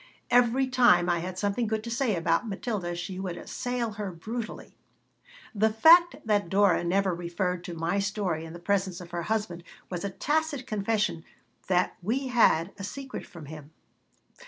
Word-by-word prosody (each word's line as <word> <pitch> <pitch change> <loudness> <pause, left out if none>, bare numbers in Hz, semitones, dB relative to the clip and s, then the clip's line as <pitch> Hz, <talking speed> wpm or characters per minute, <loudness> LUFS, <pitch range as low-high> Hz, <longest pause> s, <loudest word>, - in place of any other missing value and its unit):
Every 245 +2 +4
time 240 -9 +4
I 170 - +1
had 180 +2 -5
something 205 +4 0
good 220 0 -2
to 235 - -6
say 230 -3 +1
about 165 +6 +1
Matilda 195 -4 -3
she 185 +2 -5
would 180 -2 -4
assail 245 -2 -3
her 205 -2 -5
brutally 220 +7 -6 0.8
The 220 +1 +3
fact 335 +10 +7
that 205 -4 +1
Dora 195 -3 +3
never 190 +2 +1
referred 175 +1 -2
to 175 - -6
my 165 +4 0
story 195 -5 -1
in 165 0 -9
the - - -7
presence 190 0 -1
of 175 -1 -11
her 175 0 -3
husband 190 -3 -2 0.3
was 180 0 -3
a 200 - -1
tacit 295 - -1
confession 210 -6 -1 0.4
that 180 -1 +1
we 255 +8 -1
had 200 -8 +3
a - - -6
secret 265 +6 -6
from 170 -5 -11
him. 150 0 -10
200 Hz, 170 wpm, -28 LUFS, 175-230 Hz, 0.8 s, fact